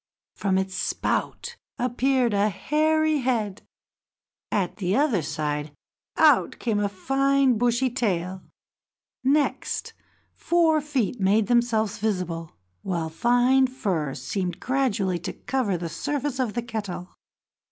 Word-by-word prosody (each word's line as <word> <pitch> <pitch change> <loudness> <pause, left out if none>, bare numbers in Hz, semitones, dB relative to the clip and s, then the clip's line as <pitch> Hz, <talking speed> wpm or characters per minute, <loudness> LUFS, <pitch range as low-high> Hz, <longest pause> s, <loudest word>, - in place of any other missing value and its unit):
From 190 -2 0
its 190 0 -1
spout - - -2 0.2
appeared 250 -1 +1
a 205 +1 +3
hairy 310 - +1
head; 225 -6 -1 0.9
at 195 -4 -1
the 190 0 0
other 270 - +2
side 150 -1 -3 0.4
out - - +4
came 220 -4 -1
a 205 -1 +1
fine 270 +5 +2
bushy 245 +1 +2
tail; 190 -7 -1 0.8
next, 285 +3 0 0.4
four 330 -3 +2
feet 265 -6 -1
made 205 +3 +3
themselves 230 -3 +1
visible, 180 -6 -2 0.3
while 170 -4 -2
fine 245 +8 +3
fur 185 - -2
seemed 180 +8 -3
gradually 220 -9 0
to 175 - -5
cover 245 -9 -1
the 170 0 -4
surface 280 - -3
of 240 -5 -1
the 240 - -1
kettle. 205 -6 -5
220 Hz, 120 wpm, -25 LUFS, 185-260 Hz, 0.9 s, out